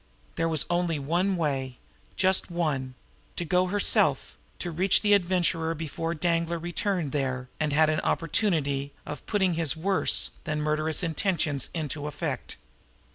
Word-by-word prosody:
There 165 0 0
was 160 -2 +1
only 175 -2 0
one 175 +7 +1
way, 135 -5 -2 0.4
just 190 0 +2
one 145 -7 -2 0.4
to 175 - -2
go 180 +3 +2
herself, 205 +2 +2 0.2
to 175 - -4
reach 185 +6 +2
the 205 -1 +5
Adventurer 175 -4 +2
herself 165 -1 -2
before 165 +2 -3
Danglar 170 +1 0
returned 175 -1 -2
there 130 -3 -2
and 150 -2 0
had 155 +2 +4
an 155 0 +1
opportunity 150 -6 0
of 150 -2 -7
putting 190 -4 +2
his 160 -3 -1
worse 190 +4 +2
than 150 0 -2
murderous 155 +2 0
intentions 160 -4 0
into 150 -2 -3
effect. 150 - -4
165 Hz, 145 wpm, -27 LUFS, 150-180 Hz, 0.4 s, the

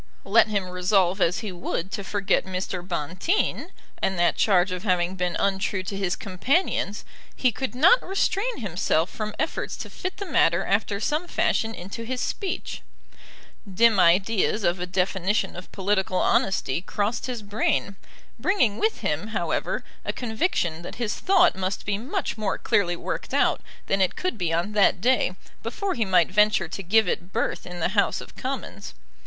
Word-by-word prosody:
Let 215 +3 +5
him 200 -3 -1
resolve 180 +1 +1
as 175 +1 +2
he 215 -4 -4
would 175 +1 -4
to 200 - -4
forget 200 0 +1
Mr. 185 -1 -4
Bonteen, 180 - -1 0.3
and 190 - 0
that 175 -1 +3
charge 190 -2 +3
of 180 -1 -3
having 180 -3 +1
been 180 -2 -1
untrue 195 0 0
to 190 +2 -5
his 190 -3 -1
companions, 210 - -1 0.3
he 255 - +2
could 260 +1 -4
not 365 - +6
restrain 395 - -1
himself 175 -3 0
from 215 -1 -5
efforts 315 - -2
to - - -7
fit 370 0 -5
the 400 - -5
matter 175 - +2
after 200 0 0
some 305 - -1
fashion 225 -8 0
into 195 +6 -7
his 250 +2 -3
speech. 390 - -3 0.9
Dim 225 +1 +4
ideas 195 +4 +3
of 175 0 +1
a 180 - -3
definition 190 +2 0
of 180 +1 -9
political 190 -1 0
honesty 175 -6 +1
crossed 205 +6 -2
his 245 -4 -4
brain, 205 -1 0 0.4
bringing 250 - +2
with 440 +1 0
him, - - -1
however, - - -2 0.2
a - - -1
conviction 220 - -1
that 175 - -8
his 225 -3 -2
thought 370 -2 +4
must 190 +1 -3
be 205 0 -1
much 270 - -3
more 205 -3 -1
clearly 175 -4 +1
worked - - -4
out - - +2 0.2
than 195 0 +1
it 185 - +2
could 365 -8 -2
be 175 -6 -1
on 170 +5 0
that 205 -3 +3
day 245 -4 +2 0.3
before 375 - -2
he 230 -3 0
might 185 -3 +3
venture 210 +2 +3
to - - -6
give 210 +3 +3
it 175 +1 -2
birth - - -2
in 180 0 -7
the 165 - +1
House 200 +1 +1
of - - -11
Commons. 265 +1 -5
200 Hz, 170 wpm, -25 LUFS, 180-230 Hz, 0.9 s, not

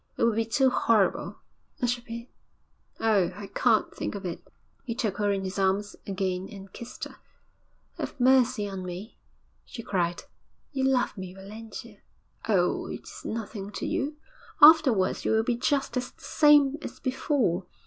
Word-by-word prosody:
'It - - 0
would 230 -1 +4
be 225 0 +1
too 260 +3 +3
horrible. 220 -5 +2 0.4
I 250 - +1
should 240 0 -1
be 235 +1 -8 0.7
oh, 210 -6 +3
I 205 - -7
can't 230 -3 +2
think - - -4
of 200 -1 -6
it!' 175 - -6 0.4
He 230 - -4
took 215 -5 -1
her 205 -1 +1
in 195 -1 -1
his 190 +1 -4
arms 195 +2 +1
again 190 -1 -2
and 195 -2 -11
kissed 235 +1 -8
her. - - -7 0.8
'Have - - -5
mercy 250 -4 +4
on 195 -2 -5
me!' 180 +5 -7 0.4
she 230 - -9
cried. 175 -4 -1 0.5
'You 270 -2 0
love 260 -5 +2
me, 185 -1 -7
Valentia.' 215 +2 -10 0.5
'Oh, 180 -4 +2
it - - -6
is - - -11
nothing 210 -3 -5
to - - -4
you. 305 -2 -2 0.4
Afterwards 295 - +6
you - - +1
will 220 0 +3
be 240 +1 0
just 270 +3 0
the 250 - +1
same 295 +2 +3
as - - -8
before. 255 - 0
220 Hz, 165 wpm, -27 LUFS, 195-255 Hz, 0.8 s, Afterwards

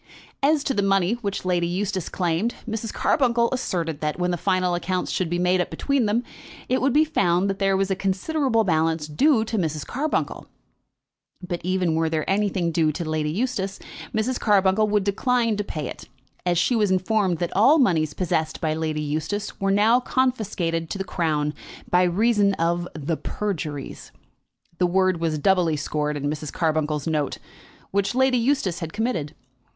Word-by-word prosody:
As 290 +1 +3
to 275 - 0
the 205 - +1
money 195 0 +2
which 200 -3 -3
Lady 175 -2 +1
Eustace 185 0 -2
claimed, 180 +6 -1
Mrs. 225 0 -3
Carbuncle 235 -4 +2
asserted 170 - -2
that, 150 -1 -1
when 180 0 0
the - - 0
final 185 0 +1
accounts 180 +1 -2
should 180 -3 -1
be 175 - -1
made 180 +1 +2
up - - -3
between 275 -5 0
them, 225 +4 +1 0.4
it 255 - +1
would 270 +2 +2
be 305 +4 +4
found 180 - +1
that 195 0 -2
there 195 -1 +2
was 195 0 0
a - - +2
considerable 225 +6 0
balance 160 -3 +1
due 225 - +3
to 220 -1 -2
Mrs. 155 -4 -2
Carbuncle. 295 +5 -2 1.0
But 175 -1 -3
even 185 -2 +1
were 160 0 +1
there 160 -1 -2
anything 195 -3 +1
due 160 -1 +2
to 165 +2 -5
Lady 155 -1 -1
Eustace, 195 0 -2 0.3
Mrs. 235 +4 -1
Carbuncle 205 0 +3
would 210 -1 +1
decline 230 +3 +1
to 210 - -1
pay 155 -7 -5
it, - - -9 0.4
as 175 -1 +2
she 210 +8 +2
was 210 -3 +2
informed 190 -1 +1
that 175 +1 -3
all 250 +11 +6
moneys 160 - +2
possessed 160 -3 -1
by 155 -1 0
Lady 155 -1 -2
Eustace 155 +8 -3
were 195 - 0
now 215 +5 +4
confiscated 205 -11 -1
to - - -3
the 195 - -2
Crown 155 -5 -1 0.4
by 180 - +5
reason 200 +2 +3
of 170 +1 0
the 155 +1 -2
PERJURIES, 160 -9 -5 0.7
the 180 - +3
word 185 -1 +2
was 160 -2 0
doubly 175 -1 +2
scored 150 0 -2
in 140 - -6
Mrs. 150 0 -3
Carbuncle's 155 -3 0
note, 150 -4 -1 0.5
which 200 +4 0
Lady 260 -1 +3
Eustace 230 - 0
had 165 -2 -6
committed. 205 -10 -2
185 Hz, 175 wpm, -24 LUFS, 165-215 Hz, 1.0 s, all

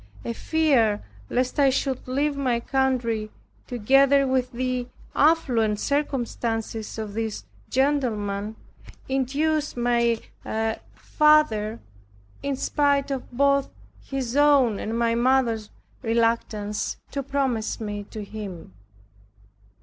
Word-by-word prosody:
A 235 - -2
fear 255 -8 +2 0.3
lest 255 +3 0
I 275 -1 +6
should 265 -1 -1
leave 280 +3 0
my 255 -4 0
country, 235 -4 0 0.4
together 275 +4 +4
with 260 -1 0
the 250 0 -2 0.3
affluent 245 -9 +3
circumstances 235 -6 -2
of 215 -2 -5
this 220 -1 -3 0.2
gentleman, 220 -7 0 0.5
induced 285 +3 0
my 235 -1 +2 0.8
father, 270 -9 +3 0.6
in 280 -1 -1
spite 285 0 +1
of 265 -2 -4
both 280 +2 +2 0.3
his 265 -3 -4
own 280 -7 +4
and 225 +2 -3
my 235 -1 +2
mother's 235 -3 +2 0.3
reluctance, 225 -3 0
to 280 - -2
promise 265 -5 -1
me 205 -2 -4
to 215 0 -7
him. 200 - -8
250 Hz, 105 wpm, -25 LUFS, 225-275 Hz, 0.8 s, I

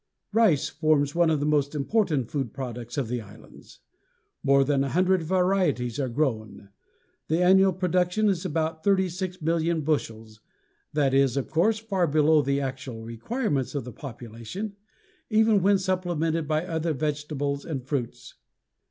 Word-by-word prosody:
Rice 215 -10 +3
forms 150 -1 +1
one 170 -1 +3
of 155 -2 +1
the 145 - -1
most 150 -1 +1
important 150 - 0
food 135 -6 -3
products 120 -2 -6
of 135 -5 -1
the 120 +1 -3
islands; 105 -1 -16 0.6
more 140 0 +4
than 135 0 +1
a 140 - -2
hundred 185 +2 +2
varieties 175 - +1
are 130 -2 -1
grown; 110 -7 -2 0.6
the 160 +2 +1
annual 190 +2 +5
production 180 +3 +1
is 185 -4 0
about 160 +1 -2
36,000,000 175 -4 0
bushels. 110 -8 -3 0.5
This 140 -3 +1
is, 135 -1 +3
of 135 - -3
course, 215 +7 +2
far 195 -5 -1
below 155 +1 +4
the 140 0 0
actual 130 -4 -5
requirements 140 - -2
of 140 - -2
the 125 0 -9
population, 125 - -7 0.5
even 220 -2 +4
when 200 +2 +4
supplemented 175 -4 -1
by 155 +2 0
other 165 -2 -1
vegetables 145 -1 -2
and 135 -6 -5
fruits. 130 -4 -4
155 Hz, 145 wpm, -26 LUFS, 135-180 Hz, 0.6 s, annual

